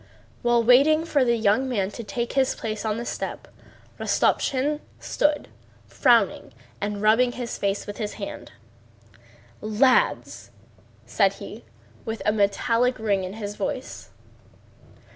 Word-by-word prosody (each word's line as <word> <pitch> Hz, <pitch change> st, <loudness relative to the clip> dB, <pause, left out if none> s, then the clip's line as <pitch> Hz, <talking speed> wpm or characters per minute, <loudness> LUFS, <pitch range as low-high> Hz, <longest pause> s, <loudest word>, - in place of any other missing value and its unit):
While 240 Hz, -1 st, +3 dB
waiting 285 Hz, +7 st, +5 dB
for 290 Hz, -5 st, +2 dB
the 235 Hz, -1 st, +2 dB
young 225 Hz, +4 st, +2 dB
man 200 Hz, -5 st, -1 dB
to 235 Hz, -, -7 dB
take 235 Hz, +3 st, -4 dB
his 270 Hz, -1 st, +2 dB
place 215 Hz, -1 st, -5 dB
on 215 Hz, 0 st, -1 dB
the 235 Hz, -, -5 dB
step -, -, -5 dB, 0.5 s
Rostopchín 285 Hz, +3 st, +1 dB, 0.2 s
stood 295 Hz, 0 st, 0 dB, 0.4 s
frowning 235 Hz, -, +2 dB, 0.3 s
and 205 Hz, 0 st, -3 dB
rubbing 240 Hz, +3 st, +4 dB
his 245 Hz, -2 st, -5 dB
face 200 Hz, 0 st, -1 dB
with 205 Hz, -, -7 dB
his 210 Hz, -2 st, -4 dB
hand. -, -, -8 dB, 1.1 s
"Lads!" 255 Hz, -, +1 dB, 0.6 s
said -, -, +2 dB
he, -, -, -10 dB, 0.4 s
with 225 Hz, -3 st, -5 dB
a -, -, +4 dB
metallic 230 Hz, +4 st, +1 dB
ring 205 Hz, -3 st, 0 dB
in 185 Hz, +1 st, -5 dB
his 205 Hz, -1 st, -6 dB
voice. -, -, -5 dB
230 Hz, 130 wpm, -24 LUFS, 210-255 Hz, 1.1 s, waiting